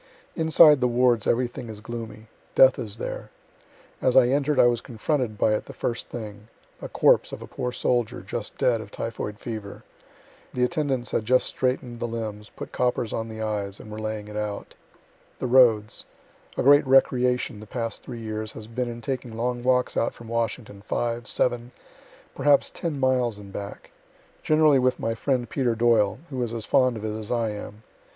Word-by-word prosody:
Inside 160 Hz, -3 st, +6 dB
the 125 Hz, -, +4 dB
wards 120 Hz, -2 st, +2 dB
everything 120 Hz, -1 st, -1 dB
is 110 Hz, -1 st, -8 dB
gloomy. 110 Hz, -1 st, -7 dB, 0.3 s
Death 130 Hz, 0 st, +6 dB
is 110 Hz, -4 st, -4 dB
there. -, -, -6 dB, 0.7 s
As 130 Hz, -, +3 dB
I 125 Hz, -2 st, +6 dB
enter'd, 145 Hz, +1 st, +1 dB
I -, -, +7 dB
was 120 Hz, -1 st, +2 dB
confronted 120 Hz, -1 st, -2 dB
by 110 Hz, -, +3 dB
it 105 Hz, -, -1 dB
the -, -, -10 dB
first 115 Hz, -1 st, -3 dB
thing; 105 Hz, -2 st, -8 dB, 0.3 s
a -, -, -6 dB
corpse -, -, +3 dB
of -, -, -7 dB
a -, -, -10 dB
poor 125 Hz, 0 st, -4 dB
soldier, 120 Hz, -2 st, 0 dB
just -, -, -5 dB
dead, 115 Hz, -3 st, +2 dB
of 105 Hz, -, -10 dB
typhoid 105 Hz, -1 st, -5 dB
fever. 110 Hz, -3 st, -7 dB, 0.7 s
The 125 Hz, -, +1 dB
attendants 135 Hz, -3 st, -1 dB
had -, -, 0 dB
just 130 Hz, +2 st, +3 dB
straighten'd 125 Hz, -2 st, -2 dB
the 120 Hz, -, -2 dB
limbs, 110 Hz, -2 st, -5 dB
put -, -, -9 dB
coppers 125 Hz, -3 st, 0 dB
on 115 Hz, 0 st, -3 dB
the 110 Hz, 0 st, -5 dB
eyes, 100 Hz, -2 st, -3 dB
and 110 Hz, -, -11 dB
were 105 Hz, -, -6 dB
laying 110 Hz, -1 st, -4 dB
it 105 Hz, -, -9 dB
out. 105 Hz, -1 st, -4 dB, 0.6 s
The -, -, -4 dB
roads 120 Hz, -4 st, +4 dB, 0.5 s
A -, -, +1 dB
great 145 Hz, +1 st, +6 dB
recreation, 125 Hz, -3 st, +3 dB
the 105 Hz, -, -11 dB
past 115 Hz, 0 st, -4 dB
three 120 Hz, -2 st, -8 dB
years, 110 Hz, -1 st, -5 dB
has 110 Hz, -, -8 dB
been 120 Hz, +2 st, -3 dB
in 120 Hz, 0 st, -7 dB
taking 125 Hz, -2 st, -4 dB
long 120 Hz, +1 st, -1 dB
walks 125 Hz, 0 st, +1 dB
out 115 Hz, -, 0 dB
from 115 Hz, -, -12 dB
Washington, 115 Hz, -2 st, -3 dB
five, 120 Hz, +3 st, -2 dB
seven, 120 Hz, -1 st, -1 dB, 0.6 s
perhaps 140 Hz, +1 st, +3 dB
ten 160 Hz, -5 st, -4 dB
miles 125 Hz, -4 st, +1 dB
and 100 Hz, -1 st, -12 dB
back; 100 Hz, 0 st, -8 dB, 0.5 s
generally 155 Hz, -3 st, +4 dB
with 130 Hz, 0 st, +1 dB
my 115 Hz, -, -1 dB
friend 125 Hz, +1 st, -1 dB
Peter 120 Hz, -1 st, 0 dB
Doyle, 110 Hz, -3 st, +3 dB
who 130 Hz, -2 st, -3 dB
is 120 Hz, -1 st, -2 dB
as 115 Hz, -, -5 dB
fond 130 Hz, -3 st, +3 dB
of 110 Hz, -, -6 dB
it 110 Hz, 0 st, -3 dB
as 110 Hz, -1 st, -6 dB
I 115 Hz, -3 st, 0 dB
am. 105 Hz, +1 st, -8 dB
120 Hz, 190 wpm, -25 LUFS, 110-125 Hz, 0.7 s, I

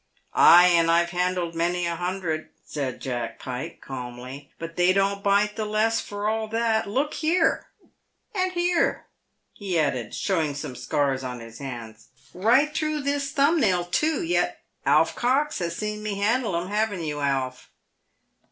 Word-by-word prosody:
" -, -, -41 dB
Ay, 175 Hz, +1 st, +8 dB
and 170 Hz, -1 st, +4 dB
I've 170 Hz, +1 st, +3 dB
handled 180 Hz, -1 st, -1 dB
many 175 Hz, +1 st, 0 dB
a 170 Hz, 0 st, -1 dB
hundred," 175 Hz, -3 st, -3 dB, 0.2 s
said 135 Hz, -4 st, -4 dB
Jack 120 Hz, -3 st, -4 dB
Pike, 125 Hz, 0 st, -6 dB
calmly; 130 Hz, +2 st, -8 dB
"but 165 Hz, 0 st, -7 dB
they 180 Hz, +1 st, +4 dB
don't 200 Hz, +1 st, +1 dB
bite 205 Hz, +1 st, +2 dB
the 220 Hz, -, -2 dB
less 215 Hz, +2 st, +1 dB
for 205 Hz, 0 st, -4 dB
all 220 Hz, 0 st, -1 dB
that. 225 Hz, -1 st, 0 dB
Look 275 Hz, +8 st, 0 dB
here, 330 Hz, +1 st, +1 dB, 0.7 s
and 370 Hz, -2 st, 0 dB
here," 350 Hz, -1 st, +1 dB, 0.5 s
he 190 Hz, -4 st, -3 dB
added, 130 Hz, -7 st, -1 dB
showing 160 Hz, -7 st, 0 dB
some 135 Hz, -3 st, -6 dB
scars 135 Hz, 0 st, -1 dB
on 125 Hz, -1 st, -5 dB
his 115 Hz, 0 st, -11 dB
hands. 120 Hz, -5 st, -8 dB, 0.2 s
" -, -, -26 dB
Bight 250 Hz, +11 st, +3 dB
through 310 Hz, -1 st, -1 dB
this 280 Hz, 0 st, -1 dB
thumb 290 Hz, +4 st, +3 dB
nail, 185 Hz, -8 st, +2 dB
too, 310 Hz, -, 0 dB
yet 340 Hz, +1 st, 0 dB, 0.2 s
Alf -, -, +4 dB
Cox 275 Hz, +5 st, +1 dB
has 170 Hz, -2 st, -2 dB
seen 210 Hz, 0 st, -4 dB
me 210 Hz, -1 st, -3 dB
handle 215 Hz, 0 st, +1 dB
'em, 180 Hz, +2 st, -6 dB
hav'n't 205 Hz, -4 st, -1 dB
you, 150 Hz, -1 st, -3 dB
Alf?" 135 Hz, -3 st, -2 dB
185 Hz, 165 wpm, -25 LUFS, 150-225 Hz, 0.7 s, Ay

